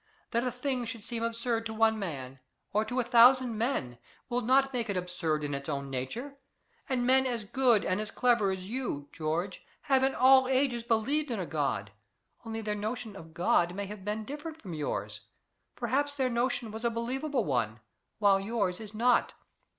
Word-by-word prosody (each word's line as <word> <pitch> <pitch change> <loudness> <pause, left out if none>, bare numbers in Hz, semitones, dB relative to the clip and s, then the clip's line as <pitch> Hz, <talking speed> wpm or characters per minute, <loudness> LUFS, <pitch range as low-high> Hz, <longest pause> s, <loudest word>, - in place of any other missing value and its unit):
"That 235 0 +1
a 255 - +1
thing 250 0 -2
should 230 -2 -7
seem 230 0 -4
absurd 230 0 -1
to 220 - -6
one 220 0 +3
man, 135 -8 -5 0.3
or 210 +2 +3
to 245 +4 -2
a - - +2
thousand 245 0 +6
men, 210 - -1 0.3
will 245 0 0
not 270 +3 +3
make 235 -3 -2
it 200 - 0
absurd 175 -4 -2
in 145 -1 -2
its 140 +2 -4
own 140 -2 -3
nature; 230 - -5 0.5
and 250 -2 +1
men 265 +1 +4
as 235 -3 -2
good 240 0 +3
and 185 +3 0
as 215 - -5
clever 235 -4 +2
as 190 -1 -4
you, 215 - -3
George, 165 +4 -3 0.2
have 270 -1 +3
in 265 0 +2
all 260 +1 +6
ages 260 -2 +2
believed 250 +6 +1
in 230 -4 -2
a 185 - -2
God. 135 -11 -2 0.5
Only 225 -1 -4
their 210 -1 -2
notion 215 +1 -4
of 165 -3 -12
God 175 0 +2
may 200 0 -3
have 200 0 -8
been 210 +2 -3
different 300 +5 -7
from 185 - -8
yours. 150 -2 -3 0.6
Perhaps 280 +4 0
their 260 -2 +1
notion 235 -1 0
was 220 +2 -7
a 235 - +3
believable 250 +3 -1
one, 120 -6 0 0.4
while 200 -2 +4
yours 195 -3 -1
is 215 -1 -9
not." 245 +3 +3
225 Hz, 190 wpm, -30 LUFS, 185-250 Hz, 0.6 s, thousand